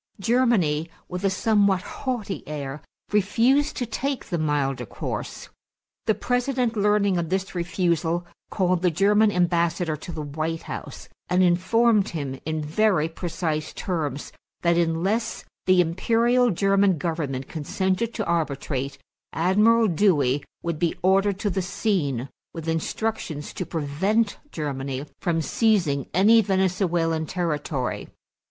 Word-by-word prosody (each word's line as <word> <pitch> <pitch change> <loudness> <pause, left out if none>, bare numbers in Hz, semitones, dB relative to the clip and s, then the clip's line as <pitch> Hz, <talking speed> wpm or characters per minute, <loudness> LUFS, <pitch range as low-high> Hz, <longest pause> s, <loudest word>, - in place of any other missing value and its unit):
Germany, 195 -9 +2 0.2
with 180 +1 -5
a 195 - +3
somewhat 200 -1 +2
haughty 240 -7 -4
air, 145 -1 -5 0.3
refused 235 +9 +2
to 245 - -1
take 270 +4 -3
the 170 - -2
milder 135 -5 0
course. - - -5 0.6
The 220 - +3
President, 245 -1 0
learning 205 -3 +2
of 165 -2 -3
this 190 +1 -2
refusal, 175 -1 0 0.2
called 185 -3 +1
the 180 - +3
German 205 +5 +3
ambassador 170 -2 +1
to 165 +4 -8
the 155 -2 -5
White 155 +3 -3
House - - -7 0.2
and 180 +1 +3
informed 210 +4 +3
him 140 -5 -4
in 155 -1 -1
very 165 +1 +2
precise 160 -2 -3
terms 150 -7 -3 0.3
that, 170 0 +3
unless 175 +7 0 0.2
the 185 -1 +6
Imperial 230 +8 +2
German 195 -1 +3
Government 145 -5 -3
consented 190 +7 -1
to 220 - -2
arbitrate, 140 -4 -2 0.4
Admiral 210 +7 +4
Dewey 155 -8 +2 0.2
would 170 -2 -2
be 170 -2 +1
ordered 195 +1 +3
to 205 - 0
the 190 - 0
scene 175 - -1 0.3
with 165 -1 -7
instructions 165 -1 -2
to 185 - -4
prevent 190 +8 0
Germany 140 -2 -4
from 165 -3 0
seizing 170 - +1
any 215 +6 +6
Venezuelan 180 -5 +1
territory. 150 -7 -2
180 Hz, 125 wpm, -24 LUFS, 155-205 Hz, 0.6 s, the